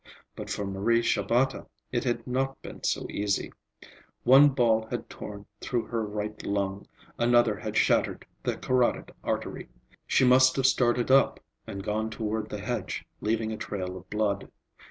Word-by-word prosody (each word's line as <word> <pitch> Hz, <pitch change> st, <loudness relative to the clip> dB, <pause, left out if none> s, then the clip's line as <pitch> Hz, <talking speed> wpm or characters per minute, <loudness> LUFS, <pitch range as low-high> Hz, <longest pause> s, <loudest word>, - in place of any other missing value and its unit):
But -, -, -7 dB
for 105 Hz, -, -2 dB
Marie 105 Hz, +5 st, +1 dB
Shabata 120 Hz, +6 st, +1 dB, 0.2 s
it 120 Hz, 0 st, -1 dB
had 120 Hz, -2 st, -1 dB
not 135 Hz, +2 st, -1 dB
been -, -, -9 dB
so -, -, 0 dB
easy. 100 Hz, 0 st, -1 dB, 0.7 s
One 135 Hz, +4 st, +8 dB
ball 115 Hz, -4 st, +2 dB
had 120 Hz, -2 st, -5 dB
torn 100 Hz, -1 st, -8 dB
through 120 Hz, -2 st, -1 dB
her 115 Hz, -2 st, -2 dB
right 105 Hz, 0 st, -4 dB
lung, 100 Hz, 0 st, -2 dB, 0.3 s
another 120 Hz, -2 st, +4 dB
had -, -, -3 dB
shattered -, -, +2 dB, 0.2 s
the -, -, -2 dB
carotid 125 Hz, -1 st, +1 dB
artery. -, -, -3 dB, 0.4 s
She 130 Hz, -, +4 dB
must 130 Hz, +1 st, +6 dB
have 135 Hz, -, +1 dB
started 125 Hz, -1 st, +3 dB
up 135 Hz, 0 st, +5 dB, 0.3 s
and 100 Hz, 0 st, -6 dB
gone 110 Hz, +1 st, -1 dB
toward 110 Hz, -1 st, -3 dB
the 105 Hz, -, -4 dB
hedge, -, -, -3 dB
leaving 110 Hz, +1 st, -1 dB
a 110 Hz, -, -4 dB
trail 95 Hz, -3 st, -4 dB
of 95 Hz, 0 st, -11 dB
blood. 105 Hz, -2 st, -1 dB
110 Hz, 155 wpm, -28 LUFS, 105-125 Hz, 0.7 s, One